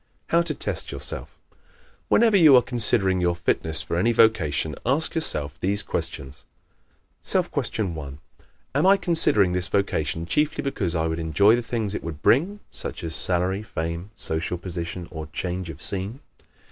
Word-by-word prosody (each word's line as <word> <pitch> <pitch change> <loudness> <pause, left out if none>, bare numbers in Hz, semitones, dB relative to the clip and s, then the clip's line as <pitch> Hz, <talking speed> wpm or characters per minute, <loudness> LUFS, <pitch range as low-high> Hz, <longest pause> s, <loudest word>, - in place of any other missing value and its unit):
How 170 - +4
to 170 -2 -3
Test - - -4
Yourself - - -6 0.2
¶ - - -34 0.5
Whenever 225 -2 +4
you 160 -8 +8
are 125 - +6
considering 105 -6 +2
your 85 -1 +1
fitness 80 -2 +2
for 85 - -3
any 115 +7 +3
vocation, 80 -10 +2
ask 140 +6 +1
yourself 75 - -2
these 100 +2 -1
questions: 70 +1 -6 0.8
_Self - - 0
Question 100 -6 -2
1 70 -3 -7 0.6
Am 145 +7 +3
I 200 +1 +6
considering 160 - +3
this 90 0 0
vocation 85 -5 -1
chiefly 150 - 0
because 100 -11 -2
I 80 0 0
would 80 0 -2
enjoy 100 +7 +4
the 120 - -1
things 115 -4 -3
it - - -4
would 80 -2 -7
bring 190 - +2
such - - -6
as 80 -1 -4
salary, 95 +2 0
fame, 85 -2 -5
social 85 -1 -2
position 85 -1 -5
or 80 -2 -6
change 90 +3 -4
of 75 -2 -9
scene? 100 +7 -4
95 Hz, 165 wpm, -24 LUFS, 80-120 Hz, 0.8 s, you